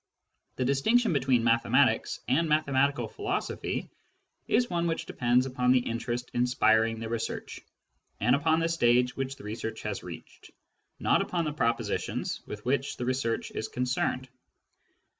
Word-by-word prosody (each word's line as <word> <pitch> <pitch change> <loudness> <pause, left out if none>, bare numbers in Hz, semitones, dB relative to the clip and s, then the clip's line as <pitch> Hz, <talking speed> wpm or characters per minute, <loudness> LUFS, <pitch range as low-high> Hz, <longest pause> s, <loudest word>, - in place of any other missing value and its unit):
The 130 - -1
distinction 200 - +3
between 130 -4 +2
mathematics 115 0 +2
and 160 +5 +2
mathematical 140 -1 +2
philosophy 405 -1 -3 0.6
is 245 - +3
one 170 -3 -1
which 165 -1 -2
depends 125 0 +2
upon 125 -1 +1
the 130 - +6
interest 120 +1 -3
inspiring 115 -2 +2
the 115 - -4
research, 115 0 -4 0.6
and 120 +5 +4
upon 160 +3 +2
the 165 - +2
stage 125 -6 +2
which 135 0 -3
the 135 - -14
research 110 +1 -5
has - - -3
reached; - - -11 0.5
not - - +3
upon 170 -2 -1
the 150 - -2
propositions 115 -5 -1
with 105 0 -8
which 135 +2 0
the 125 - -3
research 125 -3 -1
is 110 - -4
concerned. 125 +1 -1
130 Hz, 140 wpm, -28 LUFS, 120-150 Hz, 0.6 s, the